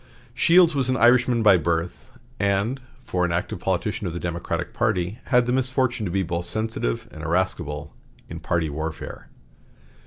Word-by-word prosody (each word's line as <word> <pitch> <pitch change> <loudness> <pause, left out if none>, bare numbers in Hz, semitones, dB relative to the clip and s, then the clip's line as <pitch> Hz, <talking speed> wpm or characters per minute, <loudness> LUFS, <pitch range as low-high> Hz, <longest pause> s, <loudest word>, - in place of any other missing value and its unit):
Shields 170 -1 +5
was 135 -3 0
an 130 - +1
Irishman 120 -1 +4
by 100 -4 +7
birth, 85 +1 -2 0.3
and, 100 +6 0 0.2
for 95 -6 -1
an 90 - +1
active 85 - -2
politician - - -1
of 85 - -4
the 85 - -4
Democratic 85 -1 -3
party, 105 -3 -1
had 125 -1 +3
the 120 - -1
misfortune 130 -4 0
to - - -4
be 95 +1 +1
both 85 0 -3
sensitive 110 - -2
and 80 - -10
irascible 80 -3 -2 0.3
in - - -7
party 85 -2 0
warfare. 80 +2 -6
95 Hz, 160 wpm, -24 LUFS, 85-120 Hz, 0.3 s, by